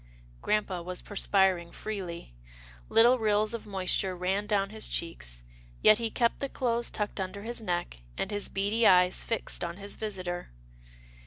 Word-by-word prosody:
Grampa 200 Hz, -4 st, 0 dB
was 180 Hz, +1 st, -5 dB
perspiring 190 Hz, -4 st, +1 dB
freely. 180 Hz, -, -6 dB, 0.6 s
Little 240 Hz, +3 st, +6 dB
rills 215 Hz, 0 st, +2 dB
of 230 Hz, -2 st, -6 dB
moisture 190 Hz, -1 st, 0 dB
ran 190 Hz, +3 st, -1 dB
down 200 Hz, -2 st, +1 dB
his 220 Hz, 0 st, -3 dB
cheeks, -, -, -4 dB, 0.4 s
yet 215 Hz, -, +7 dB
he 230 Hz, -1 st, 0 dB
kept 235 Hz, +1 st, +1 dB
the 275 Hz, -, -3 dB
clothes 240 Hz, -2 st, 0 dB
tucked 210 Hz, -1 st, -3 dB
under 195 Hz, +2 st, -4 dB
his 235 Hz, +1 st, -3 dB
neck, 175 Hz, -, -3 dB, 0.2 s
and -, -, -2 dB
his 205 Hz, -1 st, -1 dB
beady 205 Hz, +4 st, +2 dB
eyes 180 Hz, 0 st, +5 dB
fixed 230 Hz, -5 st, -1 dB
on 170 Hz, 0 st, -4 dB
his 200 Hz, 0 st, -5 dB
visitor. 185 Hz, -5 st, -4 dB
200 Hz, 155 wpm, -29 LUFS, 180-215 Hz, 0.6 s, yet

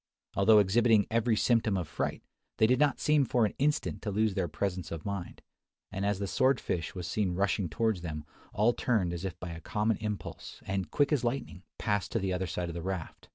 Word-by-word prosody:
Although 105 Hz, +2 st, +6 dB
exhibiting 105 Hz, +2 st, +4 dB
every 115 Hz, 0 st, +2 dB
symptom 110 Hz, -2 st, +2 dB
of 90 Hz, -4 st, -3 dB
fright, -, -, -3 dB, 0.3 s
they 110 Hz, -, +5 dB
did 125 Hz, +3 st, +3 dB
not 145 Hz, -2 st, +3 dB
seem 150 Hz, -1 st, +3 dB
for 120 Hz, -3 st, +2 dB
an 105 Hz, -, -2 dB
instant 150 Hz, +2 st, 0 dB
to 110 Hz, -, -3 dB
lose 105 Hz, +1 st, +1 dB
their 95 Hz, -2 st, 0 dB
presence 90 Hz, +1 st, -3 dB
of 80 Hz, -1 st, -6 dB
mind; 100 Hz, -3 st, -5 dB, 0.5 s
and 100 Hz, +1 st, -2 dB
as 100 Hz, -1 st, +1 dB
the 100 Hz, -, -2 dB
sword 130 Hz, +6 st, +2 dB
fish 85 Hz, +1 st, -3 dB
was 90 Hz, -2 st, -4 dB
seen 90 Hz, 0 st, -1 dB
rushing 100 Hz, -1 st, 0 dB
towards 110 Hz, +2 st, 0 dB
them, 75 Hz, -3 st, -5 dB, 0.3 s
all 110 Hz, +4 st, +3 dB
turned 105 Hz, -10 st, 0 dB
as 85 Hz, +2 st, -4 dB
if 95 Hz, -, -5 dB
by 90 Hz, -, -6 dB
a 85 Hz, 0 st, -8 dB
common 105 Hz, +5 st, 0 dB
impulse, 105 Hz, -2 st, -6 dB
and, 95 Hz, -1 st, -2 dB
quick 145 Hz, +1 st, +2 dB
as 145 Hz, -5 st, +2 dB
lightning, 120 Hz, -6 st, -3 dB, 0.2 s
passed 105 Hz, -2 st, -1 dB
to -, -, +2 dB
the 95 Hz, -1 st, -1 dB
other 90 Hz, 0 st, -1 dB
side 85 Hz, +1 st, -3 dB
of 85 Hz, -, -5 dB
the 85 Hz, -, -5 dB
raft. 90 Hz, -2 st, -5 dB
100 Hz, 220 wpm, -30 LUFS, 90-115 Hz, 0.5 s, Although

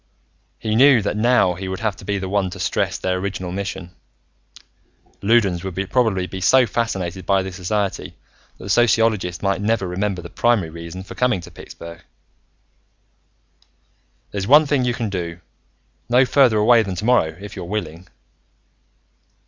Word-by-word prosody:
He 110 Hz, -, -3 dB
knew 130 Hz, -2 st, +6 dB
that 100 Hz, -, -2 dB
now 110 Hz, -4 st, +3 dB
he 95 Hz, +2 st, -7 dB
would 95 Hz, +2 st, -5 dB
have 105 Hz, -3 st, -1 dB
to -, -, -12 dB
be 100 Hz, 0 st, -1 dB
the 95 Hz, -1 st, -4 dB
one 95 Hz, -1 st, 0 dB
to 95 Hz, +2 st, -9 dB
stress 90 Hz, -, -1 dB
their 95 Hz, 0 st, -1 dB
original 95 Hz, -2 st, -4 dB
mission: 95 Hz, -2 st, -5 dB, 1.3 s
Loudons 100 Hz, -5 st, +2 dB
would 95 Hz, -2 st, -5 dB, 0.2 s
probably 110 Hz, -8 st, +1 dB
be 95 Hz, +1 st, -7 dB
so 125 Hz, +7 st, +5 dB
fascinated 95 Hz, -6 st, -3 dB
by 95 Hz, +1 st, +1 dB
this 95 Hz, -1 st, -7 dB
society 100 Hz, +1 st, -3 dB, 0.4 s
that -, -, -12 dB
the 95 Hz, -, -7 dB
sociologist 110 Hz, -6 st, +2 dB
might 100 Hz, 0 st, 0 dB
never 105 Hz, -2 st, 0 dB
remember 95 Hz, 0 st, -2 dB
the -, -, -10 dB
primary 115 Hz, -9 st, +1 dB
reason 85 Hz, +3 st, -8 dB
for -, -, -10 dB
coming 125 Hz, -6 st, +1 dB
to 85 Hz, -, -12 dB
Pittsburgh. 85 Hz, +1 st, -11 dB, 2.3 s
"There's 100 Hz, -1 st, -3 dB
one 150 Hz, +4 st, +7 dB
thing 140 Hz, -3 st, +1 dB
you 120 Hz, -1 st, 0 dB
can 115 Hz, -4 st, -3 dB
do, 85 Hz, -3 st, -4 dB, 0.7 s
no 125 Hz, +2 st, +5 dB
further 125 Hz, -4 st, +4 dB
away 115 Hz, +2 st, +5 dB
than 100 Hz, -4 st, -4 dB
tomorrow, 90 Hz, -6 st, +1 dB
if 100 Hz, 0 st, -9 dB
you're -, -, -6 dB
willing." 90 Hz, -3 st, -5 dB
100 Hz, 160 wpm, -21 LUFS, 90-115 Hz, 2.3 s, one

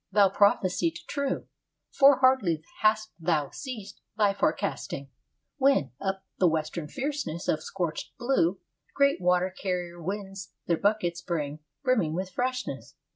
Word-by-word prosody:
Thou 200 Hz, -2 st, +5 dB
prophesiest 185 Hz, -4 st, +2 dB
true. 280 Hz, -1 st, -2 dB, 0.5 s
For 275 Hz, -1 st, +6 dB
hardly 200 Hz, -12 st, +3 dB, 0.2 s
hast 215 Hz, 0 st, +2 dB
thou 160 Hz, -4 st, 0 dB
ceased 250 Hz, -8 st, -7 dB, 0.2 s
thy 205 Hz, -2 st, +4 dB
forecasting, -, -, -2 dB, 0.5 s
When, 270 Hz, -, +3 dB
up 195 Hz, -1 st, -2 dB
the 185 Hz, -, +5 dB
western 160 Hz, 0 st, -1 dB
fierceness 270 Hz, -, -3 dB
of 155 Hz, -, +1 dB
scorched 170 Hz, -1 st, -4 dB
blue, 220 Hz, -8 st, +1 dB, 0.4 s
Great 280 Hz, -6 st, +3 dB
water 180 Hz, +1 st, +2 dB
carrier 180 Hz, -2 st, -3 dB
winds 195 Hz, +1 st, -5 dB
their 170 Hz, -, +2 dB
buckets 200 Hz, -4 st, +1 dB
bring 150 Hz, -5 st, -3 dB, 0.2 s
Brimming 220 Hz, -, +2 dB
with 185 Hz, +1 st, -3 dB
freshness. 255 Hz, +5 st, -3 dB
190 Hz, 130 wpm, -28 LUFS, 170-240 Hz, 0.5 s, For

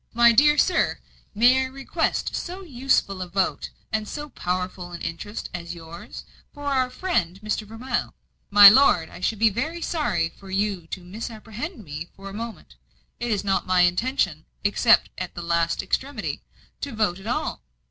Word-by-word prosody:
"My 235 Hz, 0 st, +7 dB
dear 295 Hz, +5 st, +5 dB
sir, 365 Hz, -, +2 dB, 0.4 s
may 245 Hz, +5 st, +5 dB
I -, -, 0 dB
request 270 Hz, +1 st, -2 dB
so 365 Hz, +2 st, -5 dB
useful 250 Hz, -, 0 dB
a 180 Hz, -, -4 dB
vote 190 Hz, +1 st, -1 dB, 0.2 s
and 215 Hz, -1 st, -1 dB
so 295 Hz, +4 st, -6 dB
powerful 180 Hz, -3 st, -4 dB
an 170 Hz, -, -7 dB
interest 205 Hz, +6 st, -5 dB
as 170 Hz, -1 st, -5 dB
yours, 165 Hz, 0 st, -10 dB, 0.3 s
for 290 Hz, -1 st, -10 dB
our 260 Hz, -3 st, +1 dB
friend, 250 Hz, -, -1 dB
Mr. 215 Hz, 0 st, -2 dB
Vermilye?" 240 Hz, +3 st, -3 dB, 0.4 s
"My 205 Hz, 0 st, +10 dB
lord, 200 Hz, -8 st, +6 dB
I -, -, -10 dB
should 215 Hz, +4 st, -1 dB
be 220 Hz, +1 st, +4 dB
very 305 Hz, -, -3 dB
sorry 305 Hz, -, 0 dB
for 195 Hz, +3 st, -15 dB
you 195 Hz, -3 st, -1 dB
to 185 Hz, +2 st, -6 dB
misapprehend 225 Hz, -, -7 dB
me 155 Hz, 0 st, -6 dB
for 195 Hz, 0 st, -9 dB
a -, -, -10 dB
moment. 230 Hz, +2 st, -8 dB, 0.4 s
It 240 Hz, -, -2 dB
is 210 Hz, -3 st, 0 dB
not 195 Hz, -1 st, 0 dB
my 185 Hz, -1 st, +4 dB
intention, 180 Hz, -, +1 dB, 0.2 s
except 215 Hz, +3 st, +4 dB
at 180 Hz, -1 st, -5 dB
the 175 Hz, -, -5 dB
last 170 Hz, 0 st, 0 dB
extremity, 255 Hz, +5 st, -2 dB, 0.4 s
to 280 Hz, -, -5 dB
vote 210 Hz, -5 st, 0 dB
at 195 Hz, -, -10 dB
all. 240 Hz, -, -2 dB
210 Hz, 170 wpm, -24 LUFS, 180-255 Hz, 0.4 s, My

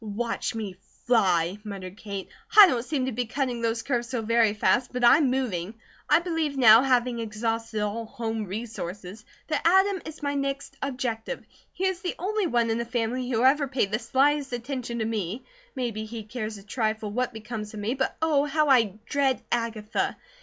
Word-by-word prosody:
"Watch 225 Hz, +2 st, -3 dB
me 205 Hz, -5 st, -5 dB, 0.3 s
fly!" 185 Hz, -5 st, +2 dB
muttered 195 Hz, -3 st, -7 dB
Kate. 200 Hz, -3 st, -6 dB, 0.3 s
"I 415 Hz, -, +13 dB
don't 250 Hz, -10 st, +1 dB
seem 265 Hz, 0 st, -1 dB
to 260 Hz, -, -2 dB
be 245 Hz, 0 st, -2 dB
cutting 250 Hz, -1 st, -2 dB
those 230 Hz, 0 st, -1 dB
curves 240 Hz, -3 st, -1 dB
so 245 Hz, -3 st, -2 dB
very 225 Hz, -1 st, +3 dB
fast; 245 Hz, +4 st, +2 dB
but 250 Hz, -1 st, -3 dB
I'm 275 Hz, +3 st, +6 dB
moving. 225 Hz, -7 st, -2 dB, 0.3 s
I -, -, +7 dB
believe 325 Hz, -4 st, -1 dB
now, 225 Hz, -3 st, +8 dB
having 250 Hz, -2 st, +2 dB
exhausted 225 Hz, 0 st, -2 dB
all 215 Hz, +2 st, -2 dB
home 225 Hz, -3 st, -3 dB
resources, 200 Hz, -1 st, -6 dB, 0.2 s
that 305 Hz, -2 st, 0 dB
Adam 380 Hz, +2 st, +4 dB
is 315 Hz, -1 st, -9 dB
my 285 Hz, 0 st, 0 dB
next 275 Hz, 0 st, -3 dB
objective. 250 Hz, -5 st, -3 dB, 0.3 s
He 380 Hz, -, -3 dB
is 375 Hz, -2 st, -1 dB
the 360 Hz, -, -3 dB
only 405 Hz, +2 st, -1 dB
one 235 Hz, -5 st, +1 dB
in 225 Hz, -, 0 dB
the -, -, 0 dB
family 240 Hz, +1 st, -2 dB
who 235 Hz, -1 st, +1 dB
ever 280 Hz, +2 st, +4 dB
paid 250 Hz, -7 st, 0 dB
the 215 Hz, -, 0 dB
slightest 280 Hz, +2 st, +1 dB
attention 245 Hz, -1 st, -4 dB
to 220 Hz, -, -1 dB
me, 215 Hz, 0 st, -3 dB, 0.3 s
maybe 230 Hz, -4 st, -3 dB
he 225 Hz, 0 st, -7 dB
cares 215 Hz, -1 st, -5 dB
a 200 Hz, -, -13 dB
trifle 215 Hz, -1 st, -2 dB
what 250 Hz, +3 st, -1 dB
becomes 220 Hz, -1 st, -6 dB
of -, -, -6 dB
me, 210 Hz, +4 st, -1 dB
but 265 Hz, 0 st, -2 dB
Oh, 295 Hz, -3 st, +3 dB
how 300 Hz, +1 st, +1 dB
I 230 Hz, -7 st, +4 dB
dread 275 Hz, -2 st, +1 dB
Agatha! 230 Hz, -2 st, -1 dB
235 Hz, 190 wpm, -26 LUFS, 215-270 Hz, 0.3 s, I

